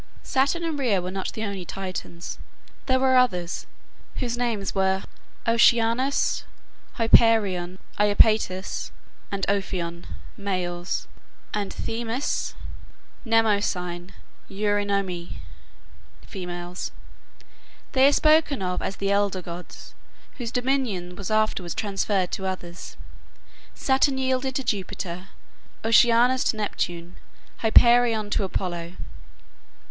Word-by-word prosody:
Saturn 280 +6 +1
and 320 -3 -2
Rhea 230 -8 +2
were 180 +1 -4
not 190 0 -3
the 220 - -4
only 200 -3 -4
Titans. 185 -2 -6 0.5
There 260 -1 +3
were 260 -1 +4
others, 180 -9 +1 0.5
whose 240 -2 -2
names 230 -5 -1
were 190 0 +1 0.4
Oceanus, 235 +3 +3 0.5
Hyperion, 210 -6 +4 0.2
Iapetus, 205 -2 +2 0.4
and 195 -1 -1
Ophion, 180 -4 -2 0.3
males; 180 -3 -3 0.5
and 205 -2 -2
Themis, 235 +4 -2 0.7
Mnemosyne, 200 -6 +1 0.4
Eurynome, 200 -3 -1 0.9
females. 180 -2 -6 1.0
They 265 0 +5
are - - +5
spoken 305 -6 +3
of 180 0 -1
as 195 - -3
the 200 0 -1
elder 200 -2 +1
gods, 175 +1 -9 0.5
whose 235 -2 -3
dominion 245 -9 -1
was 200 -1 -5
afterwards 215 -5 0
transferred 195 -2 0
to 190 - -3
others. 180 -2 -6 0.8
Saturn 265 0 +2
yielded 260 0 0
to 270 - -1
Jupiter, 190 -4 -3 0.6
Oceanus 240 +3 +5
to 220 - +1
Neptune, 175 -4 -3 0.4
Hyperion 230 -1 +5
to 210 - +1
Apollo. 175 -3 -3
205 Hz, 100 wpm, -25 LUFS, 185-235 Hz, 1.0 s, They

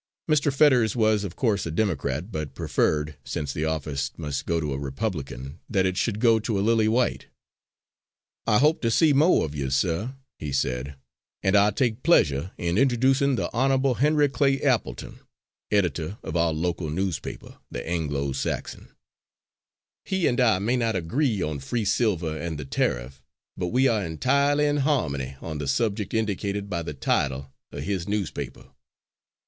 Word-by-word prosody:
Mr. 150 -2 +3
Fetters 130 -6 +4
was 110 -3 +2
of 95 -3 -5
course 105 -8 0
a - - -3
Democrat, 80 - -1
but 75 -5 -5
preferred, 75 0 0
since 70 -3 -4
the 75 - -2
office 75 -3 -2
must 70 -3 -4
go 85 0 +1
to 75 -3 -2
a 70 - -3
Republican, 70 - -4
that 95 -3 +2
it 95 -1 0
should 105 +1 -1
go 115 -1 +4
to 110 -1 -2
a 100 - 0
Lily 110 -1 +3
White. 120 +3 +1 1.2
"I 105 - +4
hope 150 +6 +3
to 115 - +1
see 150 +6 +4
mo' 155 +6 +4
of 75 - -4
you, 70 -3 -2
sir," 90 - 0 0.2
he 75 -2 -4
said, 65 +1 -1 0.5
"and 95 +1 +3
I 100 +1 +6
take 115 +1 0
pleasure 75 - +3
in 85 +3 0
introducing 135 +1 +3
the - - -3
Honourable 135 +1 +2
Henry 150 +3 +3
Clay 135 0 +1
Appleton, 120 - -1 0.5
editor 95 -2 0
of - - -5
our 85 -1 +2
local 80 0 -2
newspaper, 90 -1 -4
the - - -6
Anglo 75 -5 -1
Saxon. 65 - -4 1.2
He 190 -3 -1
and 120 - +2
I 115 -6 +4
may 115 +7 0
not 115 -3 0
agree 105 - 0
on 75 -2 -3
free 110 - -2
silver 95 -7 +1
and 80 0 -4
the 75 - -6
tariff, 65 0 -2 0.3
but 90 - -2
we 130 +7 +3
are 110 -5 +1
entirely 140 - +2
in 145 0 +1
harmony 70 - 0
on 80 -2 -5
the 75 - -4
subject 105 - 0
indicated 100 -2 -2
by 85 - -1
the 80 -3 -6
title 70 0 -1 0.2
of - - -6
his 95 -3 -2
newspaper. 105 -2 -4
100 Hz, 165 wpm, -25 LUFS, 75-120 Hz, 1.2 s, I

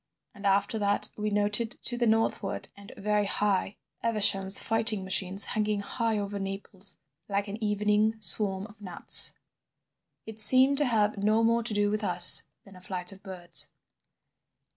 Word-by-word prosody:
And 200 0 -6
after 200 +3 -1
that 205 0 0
we 210 0 -5
noted 210 +3 -2
to 245 - +2
the 240 -1 -2
northward 225 +1 -3
and 200 0 -15
very 210 0 -2
high 200 -1 -3 0.3
Evesham's 195 -4 +1
fighting 225 -3 -1
machines 190 +1 +2
hanging 210 -1 -3
high 225 +1 -4
over 200 0 -6
Naples 195 0 -8 0.3
like 200 +1 -3
an 210 +3 -9
evening 210 +1 -1
swarm 195 -2 0
of 215 0 -18
gnats. 185 -4 +6 0.9
"It 220 0 -3
seemed 260 +6 +7
to 295 - 0
have 215 -4 -1
no 215 +2 0
more 230 +1 0
to 230 -1 -3
do 205 0 -1
with 215 +1 -4
us 180 -3 +6 0.2
than 195 -2 -18
a 185 - -16
flight 185 -1 -3
of 195 0 -15
birds. 185 -3 -4
210 Hz, 160 wpm, -26 LUFS, 195-220 Hz, 0.9 s, seemed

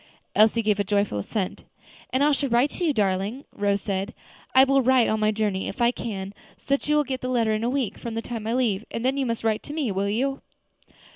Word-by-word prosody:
Elsie 220 +2 +4
gave 210 -1 +1
a - - +3
joyful 200 - 0
assent. 190 - -3 0.5
"And 260 +2 +2
I 300 - +4
shall 280 -1 0
write 245 +4 +3
to - - -5
you, 325 - +3
darling," 205 +3 -1
Rose 200 -1 0
said; 195 +1 -3 0.4
"I 260 - +9
will 275 0 +4
write 255 -1 +4
on 220 - 0
my 215 0 +2
journey, 210 -3 -1
if - - -6
I 240 0 +4
can, 200 -5 -5 0.2
so - - -24
that 280 - -1
you 300 - +4
will 300 - +4
get 265 -2 -4
the 255 - -3
letter 230 -3 +2
in 215 +1 -1
a 235 - +1
week 260 -4 -2
from 230 -1 -5
the 225 - -1
time 225 -3 -5
I 230 - 0
leave; 220 -6 +1
and 230 - -4
then 265 +1 +2
you 275 -2 -1
must 230 -1 -2
write 220 -1 +1
to 295 - -8
me; 295 -8 -1
will 195 +1 -1
you?" 270 +6 -1
230 Hz, 255 wpm, -25 LUFS, 205-260 Hz, 0.5 s, I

